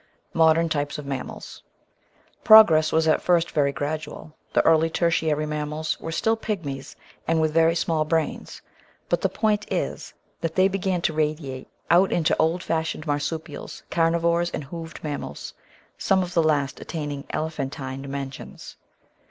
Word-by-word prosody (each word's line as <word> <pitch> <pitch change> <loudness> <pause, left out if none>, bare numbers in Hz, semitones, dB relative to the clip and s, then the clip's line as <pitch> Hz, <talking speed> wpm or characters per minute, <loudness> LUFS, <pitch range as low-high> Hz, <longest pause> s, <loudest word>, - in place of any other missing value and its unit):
Modem 165 +1 +4
Types 145 -2 -2
of 150 - -7
Mammals 135 -2 -6 0.8
Progress 165 -8 +7
was 160 0 +2
at 155 - +3
first 170 -2 +2
very 140 -2 +2
gradual; 150 +1 -5 0.2
the - - +2
early 160 0 +4
Tertiary 160 -2 +1
mam 150 -1 -3
mals 155 +1 -3
were 165 - -5
still 220 +7 +1
pigmies 165 -12 -5 0.3
and 165 0 +2
with 155 -1 +1
very 165 +1 +4
small 160 -2 +1
brains; 160 0 -2 0.5
but - - +1
the - - +1
point 210 -1 -1
is - - -3 0.2
that 165 -1 -3
they 185 0 +5
began 190 -2 -1
to 160 - +1
radiate 150 -4 -2 0.2
out 180 +3 +5
into 165 -3 +2
old 165 +3 +1
fashioned 160 -1 -2
marsupials, 145 +1 -4
carnivores, 170 +1 +2
and 150 - -5
hoofed 165 +3 -8
mammals 145 - -5 0.2
— - - -30
some 190 -1 +2
of 180 0 -7
the 170 - +4
last 145 -3 0
attaining 145 -4 -5
ele 160 +1 -2
phantine 135 -2 -5
dimensions. 140 -1 -7
160 Hz, 155 wpm, -24 LUFS, 150-170 Hz, 0.8 s, Progress